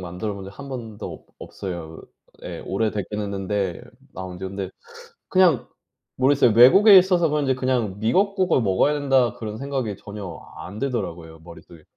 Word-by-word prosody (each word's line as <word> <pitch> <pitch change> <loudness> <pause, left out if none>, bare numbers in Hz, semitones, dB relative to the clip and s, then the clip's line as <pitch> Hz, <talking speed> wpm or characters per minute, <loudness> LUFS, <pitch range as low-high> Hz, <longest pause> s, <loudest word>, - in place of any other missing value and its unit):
만들어 90 +4 -5
본 100 - -8
적 100 +1 -12
1 140 0 -8
번도 115 -5 -7
없 - - -13
없어요. 85 -4 -7 0.4
예. - - -6
오래 105 +3 -1
되긴 105 +1 -4
했는데 100 -2 -3 0.3
나온 90 -1 -7
지. 95 - -7
근데 95 0 -5 0.6
그냥 180 -8 +3 0.5
모르겠어요. 130 -2 +4
외국에 195 - +8
있어서 180 -3 +4
그런지 145 -3 +1
그냥 125 -6 -1
'미역국을 185 - +2
먹어야 105 +8 +2
된다.' 135 -4 +2
그런 110 -1 -7
생각이 135 -6 -3
전혀 105 0 -8 0.3
안 100 +3 -8
들더라고요 85 -11 -4
머릿속에. 85 -1 -14
110 Hz, 340 characters per minute, -23 LUFS, 95-135 Hz, 0.6 s, 외국에